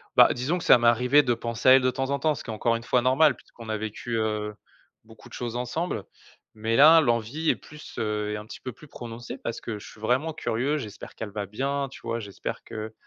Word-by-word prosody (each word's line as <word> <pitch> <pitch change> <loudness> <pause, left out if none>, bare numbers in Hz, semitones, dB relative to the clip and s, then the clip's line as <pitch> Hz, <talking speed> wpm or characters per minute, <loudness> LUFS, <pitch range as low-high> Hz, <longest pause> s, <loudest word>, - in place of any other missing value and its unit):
bah, - - +7
disons 135 +9 -1
que - - -7
ça - - +7
m'est 120 0 +2
arrivé 125 +5 +5
de 125 -3 +2
penser 115 +1 0
à - - +10
elle, 135 - +7
de 130 - +2
temps 135 +2 -2
en 140 - 0
temps, 155 -1 +1
ce - - -8
qui - - -11
est - - -4
encore, 115 +2 +1
une 115 - -5
fois 125 +1 +2
normal, 130 +3 +4
puisqu'on 115 -2 -13
a 110 - -1
vécu, 110 +2 -4
heu, 105 -1 -1 0.5
beaucoup 110 0 -16
de - - -18
choses 120 -1 -4
ensemble 125 - -2 0.5
mais, 110 +1 -1
là, 155 +5 +8
l'envie 120 +3 +1
est - - -1
plus, 150 0 -13
heu, 105 -1 -1
est - - -2
un 105 - -8
petit 110 - -10
peu 130 - -6
plus 150 - -15
prononcée 120 -3 -8
parce 115 - -5
que 110 -2 -5
je - - -11
suis 105 - -14
vraiment 130 +8 +1
curieux. 140 +2 -1
J'espère 105 -8 -8
qu'elle 110 - -5
va 100 0 -4
bien, 135 +7 -2
tu - - -12
vois? 115 0 -2
J'espère 100 -4 -6
que 110 0 -6
120 Hz, 255 wpm, -26 LUFS, 110-135 Hz, 0.5 s, à